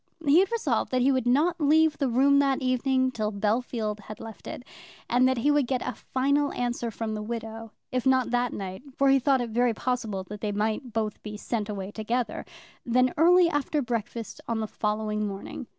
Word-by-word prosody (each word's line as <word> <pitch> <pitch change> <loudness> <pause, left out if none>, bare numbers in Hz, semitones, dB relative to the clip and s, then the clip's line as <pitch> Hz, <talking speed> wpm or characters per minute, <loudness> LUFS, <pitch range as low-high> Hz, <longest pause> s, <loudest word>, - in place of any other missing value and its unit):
He 290 +4 +6
had 385 +2 +2
resolved 465 -1 0
that 255 -1 +1
he 275 - +4
would 260 -2 0
not 320 +7 +2
leave 310 +1 +4
the 275 -3 +1
room 275 +4 +4
that 275 -1 +2
evening 260 0 +1
till 215 -3 -2
Bellfield 215 +1 -1
had 210 +1 -10
left 225 -2 -10
it; - - -7 0.4
and 250 +2 +4
that 260 -1 +1
he 285 +6 +2
would 290 -3 +2
get 255 -1 -1
a - - -2
final 280 +2 0
answer 240 -1 -2
from 225 0 -4
the 215 - -4
widow, 225 0 -6 0.2
if 255 0 0
not 260 -2 +3
that 245 0 +1
night, 190 -1 -6
for 275 0 +3
he 270 0 +5
thought 265 0 +2
it 235 -2 -4
very 240 0 +2
possible 225 -6 -2
that 205 +2 -9
they 210 - -1
might 215 +4 -2
both 215 -1 -2
be 210 -1 -7
sent 215 -1 -3
away 195 -1 -5
together, 230 +3 -2 0.4
then 255 +1 +2
early 350 +3 +6
after 295 -1 0
breakfast 230 -1 -4
on 230 -1 -1
the 220 - -1
following 210 0 -2
morning. 200 +5 -7
245 Hz, 205 wpm, -27 LUFS, 215-270 Hz, 0.4 s, He